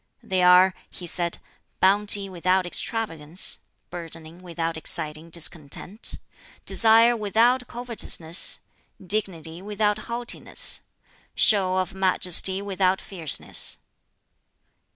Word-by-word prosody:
"They 185 -1 -1
are," 180 +1 +6 0.2
he 180 - -8
said, 170 0 -2 0.4
"Bounty 200 +1 +3
without 185 0 0
extravagance; 175 -4 -3 0.3
burdening 165 0 -9
without 165 -2 -4
exciting 155 0 -1
discontent; 170 +4 -3 0.5
desire 230 +1 +5
without 235 +4 +2
covetousness; 225 -8 -1 0.4
dignity 180 -4 -3
without 210 +1 -1
haughtiness; 235 +1 +1 0.5
show 195 -4 +3
of 185 0 -1
majesty 190 0 +2
without 190 -1 0
fierceness." 175 -7 -1
185 Hz, 90 wpm, -24 LUFS, 170-210 Hz, 0.5 s, are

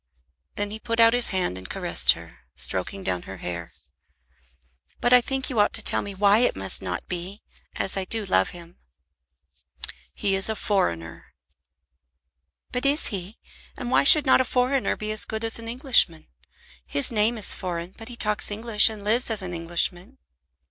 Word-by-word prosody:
Then 205 0 -3
he 215 - -6
put 230 +1 -4
out 230 0 +6
his 245 0 +5
hand 180 - -1
and 95 - -12
caressed - - +2
her, - - -14 0.2
stroking 140 - -3
down 90 - -2
her 95 - -8
hair. 85 -1 -7 1.3
"But 240 - +2
I 250 - +7
think 265 +1 -4
you 250 -6 -2
ought 205 - +2
to - - -2
tell - - +2
me 200 -1 -8
why 200 +2 +3
it 245 - +1
must 95 0 -1
not 90 -2 -6
be, 180 +3 -7 0.3
as 195 - -2
I 190 -1 -3
do 220 +2 -3
love 95 - +1
him." 175 0 -14 1.4
"He 195 - -1
is 195 +2 +2
a 220 - -2
foreigner." 85 - -2 1.5
"But 250 - -3
is 285 +2 +1
he? 195 0 -7 0.4
And 250 -3 -6
why - - +3
should 295 +1 +8
not 260 - +4
a - - +1
foreigner 255 +1 0
be 215 0 -5
as 215 - +1
good 220 0 -2
as 225 0 +1
an 230 - -9
Englishman? 235 - +3 0.6
His 140 - +3
name 225 +1 +1
is 210 - +2
foreign, 175 -1 -6
but 225 +1 -11
he 240 - -8
talks 210 -2 +1
English 215 +1 +3
and 215 -2 -9
lives 230 +5 +2
as 220 -3 -2
an 180 -1 -6
Englishman." 175 +2 -2
205 Hz, 185 wpm, -24 LUFS, 175-230 Hz, 1.5 s, should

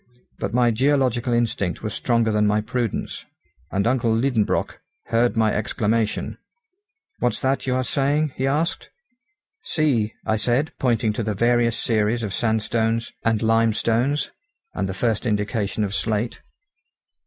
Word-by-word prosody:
But - - -2
my 120 0 +3
geological 130 -1 +1
instinct 115 -7 0
was 110 -2 -3
stronger 115 -2 +1
than 105 0 +2
my 105 +1 +2
prudence, 115 0 -3 0.5
and 100 +1 0
uncle 120 -1 +2
Liedenbrock 115 -1 0 0.3
heard 115 0 +2
my 110 -1 +3
exclamation. 110 +1 -1 0.8
"What's 125 - 0
that 135 +1 0
you 125 - +1
are 130 - +1
saying?" 140 +3 +1
he 135 - -1
asked. 155 +5 -1 0.7
"See," 125 -9 0
I 110 - +1
said, 125 +8 +1
pointing 115 -4 +1
to 110 - -2
the 105 -1 -2
varied 120 +2 +2
series 115 0 0
of 100 -3 -3
sandstones 115 +1 0
and 115 -1 +1
limestones, 115 +4 +2 0.4
and 95 0 -2
the 95 - -4
first 115 +2 0
indication 105 0 -1
of 100 -1 -2
slate. 110 +2 -1
115 Hz, 140 wpm, -23 LUFS, 110-125 Hz, 0.8 s, my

